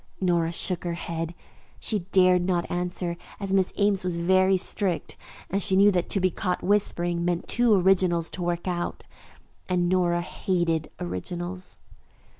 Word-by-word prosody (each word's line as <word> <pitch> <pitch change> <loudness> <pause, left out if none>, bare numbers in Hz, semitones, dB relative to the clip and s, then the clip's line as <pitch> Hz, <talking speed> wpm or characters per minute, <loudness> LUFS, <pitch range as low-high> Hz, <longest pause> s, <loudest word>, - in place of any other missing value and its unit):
Nora 170 -3 +1
shook 175 +1 0
her 170 -1 -2
head. 165 0 -5 0.4
She 205 -5 -2
dared 185 -1 +5
not 175 -1 -1
answer, 175 -1 -2 0.2
as 195 -2 -3
Miss 190 -1 +2
Ames 200 -2 +2
was 180 -2 -2
very 185 +2 +3
strict, 185 -1 -1 0.4
and 195 +2 0
she 190 - +4
knew 200 +2 +6
that 180 -2 -1
to 195 - +1
be 185 -1 +2
caught 180 0 -2
whispering 175 -4 +1
meant 175 -1 -1
two 235 -2 +3
originals 180 -3 +2
to 185 - -6
work 175 +1 -2
out, 175 -1 -3 0.7
and 180 -1 +1
Nora 175 -1 +2
hated 170 -4 -1
originals. 175 - -4
180 Hz, 155 wpm, -26 LUFS, 175-190 Hz, 0.7 s, knew